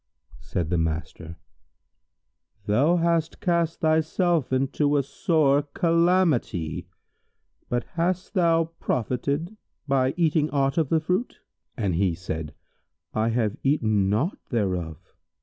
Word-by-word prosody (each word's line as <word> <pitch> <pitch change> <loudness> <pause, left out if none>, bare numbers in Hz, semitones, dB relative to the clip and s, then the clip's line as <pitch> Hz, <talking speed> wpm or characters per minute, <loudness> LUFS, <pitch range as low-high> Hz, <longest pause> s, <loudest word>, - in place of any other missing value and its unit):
Said 90 -2 -3
the 85 - +2
master, 80 0 -4 1.3
"Thou 135 +12 +3
hast 165 -1 0
cast 170 -3 0
thyself 160 -1 +1
into 140 +2 +1
sore 145 0 +2
calamity; 165 - +1 0.8
but 120 0 0
hast 180 +3 -2
thou 165 -3 +2
profited 140 - -2 0.3
by 135 -1 +1
eating 155 -2 +2
aught 135 +1 +1
of 155 -4 0
the 160 -1 +2
fruit?"; 180 +9 -1 0.4
and 100 -5 0
he 90 0 +1
said, 80 -4 -5 0.6
"I 110 +1 +1
have 115 -3 0
eaten 110 -8 +2
naught 125 - 0
thereof." 90 -8 -1
140 Hz, 110 wpm, -25 LUFS, 105-165 Hz, 1.3 s, Thou